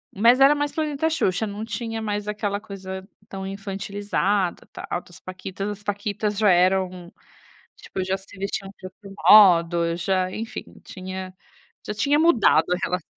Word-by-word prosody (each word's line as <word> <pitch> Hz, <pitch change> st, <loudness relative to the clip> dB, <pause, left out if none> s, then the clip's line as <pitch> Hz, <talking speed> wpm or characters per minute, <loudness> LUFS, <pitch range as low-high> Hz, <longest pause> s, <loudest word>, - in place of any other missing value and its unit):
mas 235 Hz, +6 st, +5 dB
era 275 Hz, +2 st, +7 dB
mais 290 Hz, 0 st, -1 dB
planeta 310 Hz, 0 st, -1 dB
Xuxa. 220 Hz, -, 0 dB
Não 205 Hz, +1 st, -6 dB
tinha 225 Hz, 0 st, -4 dB
mais 210 Hz, -1 st, -3 dB
aquela 205 Hz, -1 st, -2 dB
coisa 190 Hz, -2 st, -8 dB, 0.2 s
tão 190 Hz, 0 st, -6 dB
infantilizada, 200 Hz, -1 st, -2 dB
tal, -, -, -7 dB
outras 175 Hz, 0 st, -5 dB
paquitas, 185 Hz, +2 st, -6 dB
as 210 Hz, 0 st, -7 dB
paquitas 205 Hz, 0 st, -2 dB
já 210 Hz, -2 st, +4 dB
eram, 180 Hz, 0 st, +1 dB, 0.6 s
tipo, 190 Hz, -, -5 dB
já 190 Hz, +1 st, -1 dB
se 195 Hz, +1 st, -15 dB
vestiam 195 Hz, 0 st, -4 dB
de 185 Hz, -, -7 dB
outro 195 Hz, +1 st, -13 dB, 0.2 s
modo, 170 Hz, -4 st, +6 dB
já 185 Hz, +1 st, 0 dB
enfim 225 Hz, +4 st, -5 dB, 0.2 s
tinha 185 Hz, 0 st, -7 dB, 0.5 s
já 210 Hz, -, -3 dB
tinha 285 Hz, +7 st, +2 dB
mudado 315 Hz, -9 st, +4 dB
a 180 Hz, -, 0 dB
relação. 180 Hz, -1 st, -1 dB
195 Hz, 155 wpm, -23 LUFS, 185-210 Hz, 0.6 s, era